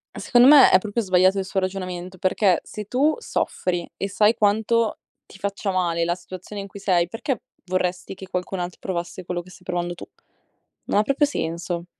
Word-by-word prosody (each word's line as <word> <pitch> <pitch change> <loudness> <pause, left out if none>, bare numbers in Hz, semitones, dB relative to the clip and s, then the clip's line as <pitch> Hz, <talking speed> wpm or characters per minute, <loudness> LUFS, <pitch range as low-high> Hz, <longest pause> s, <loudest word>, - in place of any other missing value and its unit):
Secondo 245 +1 +4
me 285 -1 +9
è 185 - +7
proprio 215 +3 -2
sbagliato 185 +1 +3
il 190 - -1
suo 195 0 -1
ragionamento, 185 -1 -4
perché 185 -1 +2
se 210 -1 -7
tu 275 +8 +2
soffri 175 - -2
e 195 - -3
sai 210 +3 +4
quanto 220 +1 +1 0.3
ti - - -14
faccia 200 +1 -3
male 170 -2 0
la 170 +1 0
situazione 185 +3 -8
in - - -8
cui 200 - -11
sei, 175 -3 +2
perché 225 +4 -3 0.2
vorresti 185 0 -2
che 190 0 -10
qualcun 180 +1 -3
altro 175 0 -5
provasse 180 0 -4
quello 175 0 -4
che 180 - -16
stai 180 0 -16
provando 175 -1 -2
tu? - - -10 0.8
Non 205 - +2
ha - - +4
proprio 275 +5 +2
senso. 170 - -3
185 Hz, 190 wpm, -23 LUFS, 180-210 Hz, 0.8 s, me